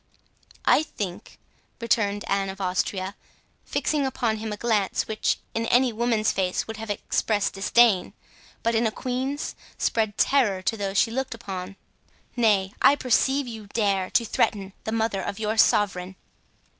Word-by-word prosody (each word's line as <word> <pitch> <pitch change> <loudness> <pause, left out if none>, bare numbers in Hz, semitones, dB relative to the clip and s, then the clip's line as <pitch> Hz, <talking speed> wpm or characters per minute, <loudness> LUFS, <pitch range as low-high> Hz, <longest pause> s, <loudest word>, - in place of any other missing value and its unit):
"I - - +5
think," 200 - -6 0.4
returned 205 -3 0
Anne 195 -1 0
of 190 +1 -7
Austria, 185 +1 -1 0.5
fixing 300 -2 0
upon 235 -4 -1
him 220 0 -5
a 210 - -4
glance, 210 -4 0
which 215 -1 0 0.2
in 230 0 -1
any 245 0 +3
woman's 225 -1 +1
face 185 -1 -1
would 225 -1 -7
have 225 0 -7
expressed 205 0 0
disdain, 205 0 +3 0.5
but 230 - +1
in 225 0 +2
a - - -1
queen's, 260 +5 -3 0.2
spread 220 -2 0
terror 210 -9 +2
to 225 - 0
those 200 -2 -3
she 225 - +3
looked 260 0 -3
upon, 190 -3 -6 0.6
"nay, 205 -5 +2
I 285 - +7
perceive 265 +1 +2
you 220 -3 -8
dare 200 -3 0
to 235 - +2
threaten 195 -2 0
the 220 - -2
mother 220 -3 0
of 195 - -4
your 220 0 -1
sovereign." 190 -4 +2
215 Hz, 155 wpm, -25 LUFS, 195-235 Hz, 0.6 s, I